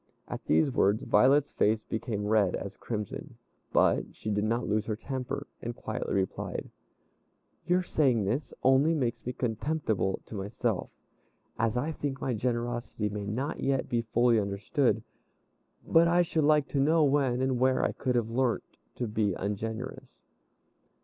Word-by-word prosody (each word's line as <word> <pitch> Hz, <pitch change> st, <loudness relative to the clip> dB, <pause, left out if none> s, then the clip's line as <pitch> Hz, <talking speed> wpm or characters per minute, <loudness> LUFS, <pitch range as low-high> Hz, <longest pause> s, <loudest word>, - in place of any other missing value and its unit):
At -, -, -6 dB
these 80 Hz, -, +3 dB
words 100 Hz, -3 st, +2 dB
Violet's 135 Hz, +6 st, +4 dB
face 110 Hz, +1 st, +2 dB
became 110 Hz, -2 st, -3 dB
red 105 Hz, -3 st, +3 dB
as 100 Hz, 0 st, -6 dB
crimson, 105 Hz, -4 st, -5 dB, 0.3 s
but -, -, +2 dB
she 110 Hz, -, -4 dB
did 105 Hz, +1 st, +1 dB
not 115 Hz, +3 st, 0 dB
lose 105 Hz, +1 st, 0 dB
her 110 Hz, -, -1 dB
temper, 130 Hz, +2 st, -4 dB, 0.2 s
and -, -, -4 dB
quietly -, -, -3 dB
replied: 95 Hz, -1 st, -2 dB, 1.0 s
"Your 180 Hz, +1 st, +3 dB
saying 130 Hz, -, +2 dB
this 125 Hz, +6 st, -1 dB
only 135 Hz, +5 st, +4 dB
makes 125 Hz, -6 st, -1 dB
me -, -, 0 dB
contemptible 115 Hz, -4 st, -1 dB
to -, -, -11 dB
myself, 100 Hz, 0 st, -2 dB, 0.7 s
as 115 Hz, +1 st, +1 dB
I 145 Hz, +6 st, 0 dB
think 145 Hz, -3 st, -4 dB
my 130 Hz, -, -1 dB
generosity 120 Hz, -1 st, -2 dB
may 105 Hz, 0 st, -5 dB
not 130 Hz, +9 st, -2 dB
yet 135 Hz, -1 st, 0 dB
be 120 Hz, -1 st, +1 dB
fully 115 Hz, +1 st, +3 dB
understood; 105 Hz, +5 st, 0 dB, 0.8 s
but 165 Hz, +1 st, +5 dB
I 175 Hz, +1 st, +4 dB
should 160 Hz, -3 st, 0 dB
like 150 Hz, -1 st, +4 dB
to 140 Hz, -, -1 dB
know 155 Hz, +3 st, +4 dB
when 135 Hz, -3 st, +2 dB
and 130 Hz, -1 st, 0 dB
where 130 Hz, 0 st, +3 dB
I -, -, +1 dB
could 125 Hz, -2 st, -2 dB
have 115 Hz, -2 st, 0 dB
learnt 125 Hz, 0 st, +1 dB, 0.3 s
to 125 Hz, -, -2 dB
be 105 Hz, -3 st, 0 dB
ungenerous." 110 Hz, +5 st, -5 dB
120 Hz, 155 wpm, -29 LUFS, 105-135 Hz, 1.0 s, but